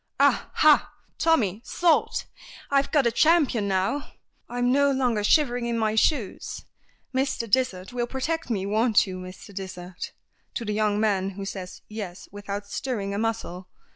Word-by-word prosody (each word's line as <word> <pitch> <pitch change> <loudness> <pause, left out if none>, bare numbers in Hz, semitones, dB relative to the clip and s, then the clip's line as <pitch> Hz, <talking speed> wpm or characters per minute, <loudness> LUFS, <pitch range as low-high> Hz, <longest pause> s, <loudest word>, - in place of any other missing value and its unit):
"Ah, - - +3
ha, 305 -1 +5 0.3
Tommy, 230 - +2
sold! 345 -2 +2 0.5
I've 275 0 +3
got 290 -4 +3
a 235 - +3
champion 280 -7 +3
now. 195 +9 -1 0.4
I'm 245 0 +1
no 280 +1 +4
longer 250 -6 +1
shivering 245 -1 +3
in 235 -1 -1
my 220 -1 +1
shoes. 220 -1 0 0.5
Mr. 265 -3 0
Dysart 210 -4 0
will 240 -1 -1
protect 300 +6 -2
me 200 -5 -1
won't 215 +2 +3
you, 185 -2 -6
Mr. 185 +2 -10
Dysart?" 185 -2 -7 0.4
to 235 - -3
the 210 - -1
young 210 -1 +1
man, 195 -3 +1
who 195 0 -5
says 190 -2 -7
"yes" 200 -4 -7
without 205 0 -5
stirring 200 -2 -3
a 200 - -2
muscle. 220 -5 -3
220 Hz, 155 wpm, -26 LUFS, 200-260 Hz, 0.5 s, ha